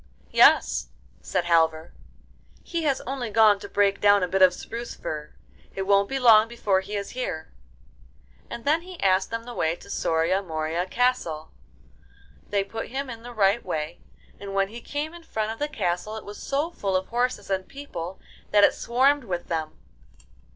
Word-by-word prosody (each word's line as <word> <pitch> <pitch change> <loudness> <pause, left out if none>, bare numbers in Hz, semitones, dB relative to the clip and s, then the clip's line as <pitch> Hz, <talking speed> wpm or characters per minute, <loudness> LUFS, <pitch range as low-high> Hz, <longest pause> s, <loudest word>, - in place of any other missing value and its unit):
'Yes,' 65 0 +5 0.3
said 175 - -1
Halvor, 160 -1 +2 0.7
'he 335 -2 -3
has 275 -3 +1
only 255 -3 -4
gone 215 -2 +5
to - - -9
break 200 -1 +2
down 205 -1 +5
a - - +1
bit 190 +2 0
of 185 -1 +8
spruce 230 +6 -7
fir. 150 -1 -6 0.4
It 195 - -2
won't 200 0 +3
be 270 - -1
long 225 -4 +7
before 210 -5 0
he 200 +2 -6
is 200 -1 -4
here.' 245 -11 -4 1.0
And 235 - -7
then 310 +3 +3
he 360 0 -11
asked 190 0 +3
them 230 0 -4
the 245 +1 -8
way 160 -6 0
to - - -13
Soria 165 +4 +1
Moria 165 0 -2
Castle. 185 -9 0 1.0
They 200 -1 +1
put 225 +3 -6
him 265 +1 -4
in 230 -1 -9
the 245 +1 -9
right 210 0 +2
way, 155 +2 -4 0.4
and 200 -1 -7
when 195 0 +2
he 235 +3 -9
came 295 +5 -4
in 345 - -11
front 220 -9 -3
of 225 - -7
the 295 - 0
castle 210 - -2
it 220 - -9
was 205 +1 -9
so 290 +5 -1
full 195 - -2
of 185 0 -1
horses 245 -3 -1
and 190 -1 -1
people 190 -11 -7 0.3
that 205 -1 +5
it - - +6
swarmed 265 +3 +2
with 175 -4 -4
them. 160 -2 -3
205 Hz, 185 wpm, -25 LUFS, 180-245 Hz, 1.0 s, of